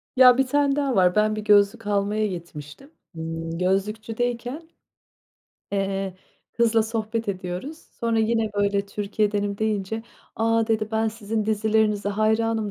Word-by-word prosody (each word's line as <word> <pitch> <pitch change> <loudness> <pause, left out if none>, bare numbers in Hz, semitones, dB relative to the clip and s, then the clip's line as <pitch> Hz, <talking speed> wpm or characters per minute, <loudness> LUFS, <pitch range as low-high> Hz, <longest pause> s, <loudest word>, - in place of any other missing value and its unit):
Ya, 255 -1 +8
1 270 - +2
tane 280 +1 +2
daha 280 -3 0
var. 180 -1 +4
Ben 215 0 +3
bir 215 - -3
gözlük 205 +1 +3
almaya 210 +1 +1
gitmiştim. 170 - -9 0.2
Imm, 165 0 -5
gözlükçüdeyken. 225 - -2 1.0
Eee, 195 -1 -1 0.4
kızla 230 -1 +3
sohbet 225 0 -3
ediyoruz. 185 - -4 0.2
Sonra 230 -2 +1
yine 225 0 +1
böyle 200 0 +1
Türkiye'denim 205 0 -1
deyince, 220 0 -1 0.3
"A," 225 0 +2
dedi. 220 -1 0
"Ben 220 0 +1
sizin 220 0 -3
dizilerinize 215 -1 +1
hayranım" 220 +1 +1
215 Hz, 130 wpm, -24 LUFS, 200-225 Hz, 1.0 s, Ya